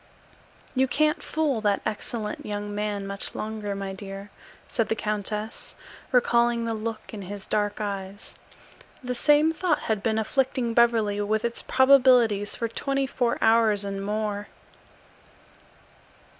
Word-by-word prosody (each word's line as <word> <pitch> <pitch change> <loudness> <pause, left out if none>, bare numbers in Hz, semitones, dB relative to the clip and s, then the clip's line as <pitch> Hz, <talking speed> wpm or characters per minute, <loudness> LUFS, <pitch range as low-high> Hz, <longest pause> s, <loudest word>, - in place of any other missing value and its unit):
"You 265 0 +2
can't 305 +5 +1
fool 300 -7 -1
that 205 -2 +1
excellent 215 0 -4
young 205 0 -4
man 205 -1 -2
much 200 0 -4
longer, 215 -2 -4
my 195 -1 -4
dear," 195 +1 -8 0.4
said 230 - -1
the 225 - +1
countess, 210 +1 -4 0.4
recalling 235 -2 +3
the 230 - -1
look 220 0 -5
in 210 - -6
his 195 +1 -7
dark 205 0 -1
eyes. 200 -1 -5 0.7
The 250 0 -2
same 295 +5 +4
thought 335 -2 0
had 220 -3 -1
been 220 +1 0
afflicting 250 +1 0
Beverly 225 -4 +3
with 215 +2 0
its 235 - -2
probabilities 250 -6 +4
for 230 - -2
twenty 275 +4 -1
four 245 -2 0
hours 225 -2 +4
and 195 0 -4
more. 210 0 -2
220 Hz, 135 wpm, -26 LUFS, 205-240 Hz, 0.7 s, same